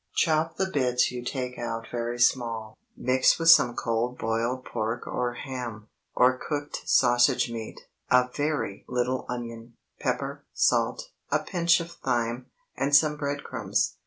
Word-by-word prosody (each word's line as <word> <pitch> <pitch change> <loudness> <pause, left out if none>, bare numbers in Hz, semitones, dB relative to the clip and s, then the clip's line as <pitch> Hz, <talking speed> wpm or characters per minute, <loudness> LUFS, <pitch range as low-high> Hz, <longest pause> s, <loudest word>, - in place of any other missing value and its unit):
Chop 160 0 +2
the 190 - +1
bits 125 -8 +1
you 125 -1 -6
take 125 0 -4
out 115 -1 -4
very 120 0 -3
small; 115 -3 +1 0.2
mix 130 +1 +3
with 165 0 +7
some 120 -6 +5
cold 120 +2 -1
boiled 115 +3 -1
pork 115 +3 -3
or 125 -1 -2
ham, 120 -5 -6 0.3
or 130 0 +4
cooked 145 -1 -4
sausage 120 -1 +4
meat, 115 -1 -7 0.3
a 125 0 +5
very 145 -9 -2
little 125 +1 -1
onion, 115 -1 -6 0.2
pepper, - - -2
salt, - - +1 0.2
a - - +3
pinch 170 -1 +2
of 170 0 -6
thyme, 120 -3 -2 0.3
and 140 +1 +2
some 150 0 +5
bread 145 -1 -3
crumbs. - - -1
125 Hz, 145 wpm, -27 LUFS, 120-145 Hz, 0.3 s, with